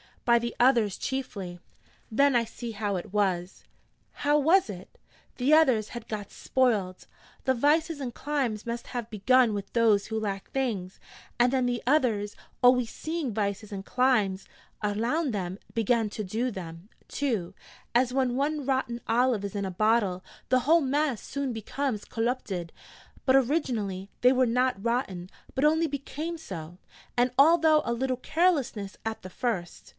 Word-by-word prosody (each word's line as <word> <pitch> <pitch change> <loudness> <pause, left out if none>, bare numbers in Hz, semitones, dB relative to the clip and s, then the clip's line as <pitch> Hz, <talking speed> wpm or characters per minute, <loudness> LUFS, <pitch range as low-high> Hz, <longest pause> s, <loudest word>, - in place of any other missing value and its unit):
'By 235 -1 +5
the 235 0 -4
others 235 -6 +4
chiefly.' 200 -10 -4 0.5
'Then 280 +4 +3
I 235 - +4
see 235 +1 -7
how 205 -2 -2
it 180 +1 -6
was!' 190 -3 -1 0.5
'How 295 +1 +1
was 330 - +4
it?' 185 -2 -9 0.4
'The 270 +4 +2
others 255 -9 +4
had 235 -2 -8
got 210 -2 -5
spoiled. 210 -8 0 0.4
The 260 - +2
vices 300 +5 +2
and 255 -4 -4
climes 260 -8 -2
must 235 0 -4
have 235 -2 -3
begun 235 +3 +3
with 200 -1 -5
those 220 -4 +3
who 220 0 -2
lacked 195 -2 -4
things, 215 -9 -2 0.4
and 245 +1 +4
then 260 -2 +1
the 245 -1 -1
others, 235 -7 +1 0.3
always 250 -2 +5
seeing 315 -5 -4
vices 205 0 -2
and 195 -1 -6
climes 220 -7 +1 0.3
alound 235 +8 0
them, 190 -1 -3
began 230 -1 +1
to 215 - -4
do 225 +6 -1
them, 175 -2 -8 0.2
too 225 -12 -2 0.4
as 250 +1 +3
when 255 -2 +1
one 290 0 -1
rotten 260 -3 -1
olive 240 -2 +2
is 200 - -4
in 200 -1 -1
a 190 - -3
bottle, 205 -2 +1 0.3
the 255 - +4
whole 325 +6 +4
mass 280 -3 0
soon 280 -2 -3
becomes 225 +1 -3
collupted: 225 -7 -2 0.5
but 260 - +5
originally 230 - 0
they 250 - +6
were 255 -1 +3
not 250 -3 +1
rotten, 215 -7 -2 0.2
but 270 - +1
only 320 +2 +3
became 305 +4 -5
so. 175 - -8 0.4
And 245 +1 +3
all 320 +5 +7
though 310 -1 +5
a 235 - 0
little 255 +1 -1
carelessness 280 - 0
at 225 0 -3
the 185 - -7
first. 185 -4 -3
235 Hz, 160 wpm, -28 LUFS, 205-265 Hz, 0.5 s, all